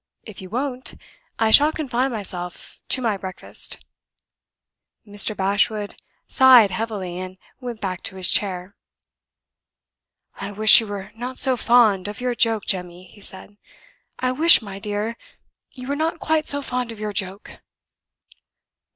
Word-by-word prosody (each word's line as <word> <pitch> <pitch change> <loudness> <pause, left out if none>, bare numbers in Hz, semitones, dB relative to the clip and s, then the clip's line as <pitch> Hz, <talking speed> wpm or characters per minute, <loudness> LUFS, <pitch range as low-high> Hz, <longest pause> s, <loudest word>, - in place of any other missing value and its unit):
If 215 -4 -11
you 185 - -10
won't, 255 +3 -4 0.4
I 225 -1 +1
shall 295 +6 +7
confine 265 -4 -2
myself 180 -5 -7
to 260 - +2
my 220 -4 0
breakfast." 190 -1 -3 1.2
Mr. 205 +1 0
Bashwood 205 +2 0 0.3
sighed 250 -6 +6
heavily, 195 -6 -4
and 185 0 -8 0.2
went 245 -4 -7
back 185 -2 -4
to 190 - -4
his 185 -1 +2
chair. 185 -1 0 1.6
"I 200 +1 -6
wish 215 +3 +7
you 225 - -7
were 200 -1 -7
not 250 +3 -7
so 260 -1 +5
fond 225 -5 +3
of 205 0 -7
your 250 0 -1
joke, 225 -3 +1
Jemmy," 180 -1 -3
he 205 - -17
said. 200 +1 -7 0.6
"I 255 0 -1
wish, 320 +6 +6
my 200 -3 -9
dear, 210 +2 -4 0.5
you 255 -2 -11
were 285 - -1
not 320 +3 -2
quite 315 -1 0
so 285 0 +3
fond 250 -2 -3
of 225 - -11
your 210 -1 -4
joke." 195 +1 -5
215 Hz, 145 wpm, -22 LUFS, 195-250 Hz, 1.6 s, shall